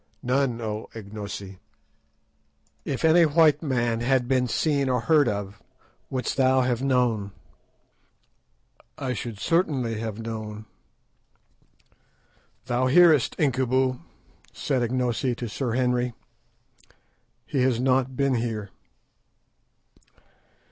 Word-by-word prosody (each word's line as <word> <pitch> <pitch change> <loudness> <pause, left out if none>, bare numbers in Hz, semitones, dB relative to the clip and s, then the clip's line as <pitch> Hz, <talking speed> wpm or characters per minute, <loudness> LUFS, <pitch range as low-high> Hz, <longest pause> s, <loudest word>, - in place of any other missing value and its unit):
"None, 125 -1 0
O 110 -1 -4
Ignosi." 100 -3 -7 1.3
"If 140 +3 -2
any 165 +2 +6
white 155 -1 +4
man 120 -6 0
had 125 +1 +1
been 130 -1 +1
seen 140 +2 0
or 125 -2 +1
heard 150 +1 +3
of, 100 -1 -5 0.5
wouldst 130 -1 -3
thou 130 -1 +4
have 125 -1 0
known?" 120 -7 0 1.6
"I 130 -3 -3
should 115 -2 -6
certainly 135 - 0
have 110 -2 -4
known." 110 -1 -6 2.0
"Thou 125 +1 0
hearest, 155 -1 +5
Incubu," 130 -2 +1 0.5
said 135 -4 -1
Ignosi 125 +1 0
to 120 - -5
Sir 120 +2 -3
Henry; 125 -1 0 1.3
"he 135 - -1
has 125 -2 +2
not 130 0 +1
been 140 -1 +2
here." 110 -4 -3
125 Hz, 100 wpm, -25 LUFS, 115-135 Hz, 2.0 s, any